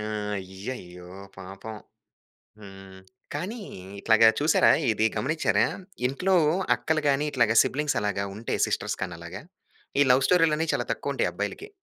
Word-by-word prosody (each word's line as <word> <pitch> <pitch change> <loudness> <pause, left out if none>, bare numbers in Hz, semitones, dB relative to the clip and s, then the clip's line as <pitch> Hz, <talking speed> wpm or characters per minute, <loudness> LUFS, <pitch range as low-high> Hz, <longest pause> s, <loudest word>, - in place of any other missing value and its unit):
ఆ! - - -4 0.4
అయ్యయ్యో! 95 -2 -8 0.3
పాపం. 95 +3 -9 0.9
హ్మ్. 95 -1 -12 0.3
కానీ 190 +11 -4 0.4
ఇట్లాగా 110 +1 +5
చూసారా? 150 +2 +4 0.2
ఇది 110 0 +1
గమనించారా? 155 +4 +1 0.4
ఇంట్లో 180 +9 0 0.4
అక్కలు 155 -1 -1
గాని, 140 +2 +1
ఇట్లాగా 120 -4 +2
సిబ్లింగ్స్ 150 -2 -1
అలాగా 100 -1 -1
ఉంటె 115 +2 -3
సిస్టర్స్ - - -2
కాని 90 -3 -6
అలాగా 85 +6 -9 0.6
ఈ - - +6
లవ్ 130 +1 +4
స్టోరీ‌లని 165 -2 +3
చాలా - - -1
తక్కువ - - -3
ఉంటాయి - - 0
అబ్బాయిలకి. 410 - -5
115 Hz, 130 wpm, -26 LUFS, 95-150 Hz, 0.9 s, ఈ